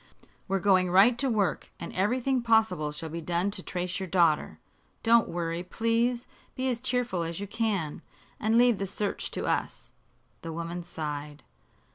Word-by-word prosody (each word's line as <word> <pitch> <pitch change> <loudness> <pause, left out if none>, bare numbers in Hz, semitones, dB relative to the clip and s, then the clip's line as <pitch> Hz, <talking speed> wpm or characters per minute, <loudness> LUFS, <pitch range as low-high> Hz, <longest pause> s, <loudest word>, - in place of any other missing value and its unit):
We're 195 0 +1
going 185 -1 +3
right 195 +7 +6
to 275 - +2
work, 210 -5 0
and 170 - -7
everything 250 +7 +1
possible 220 -10 +2
shall 160 +2 -6
be 165 +2 -5
done 175 +4 0
to 195 - -3
trace 180 0 -3
your 190 - -4
daughter. 170 -4 +2 0.5
Don't 230 0 +5
worry, 170 0 -2
please. 230 +5 0 0.3
Be 260 0 -1
as 240 - -2
cheerful 245 -7 -1
as 165 +1 -3
you 200 - -3
can, 200 -7 -2 0.4
and 220 +2 +2
leave 240 -3 +5
the 195 - -2
search 200 +2 -3
to - - -4
us." - - -2 0.5
The 165 - -6
woman 170 +2 -4
sighed. 150 -3 -6
190 Hz, 165 wpm, -28 LUFS, 170-230 Hz, 0.5 s, right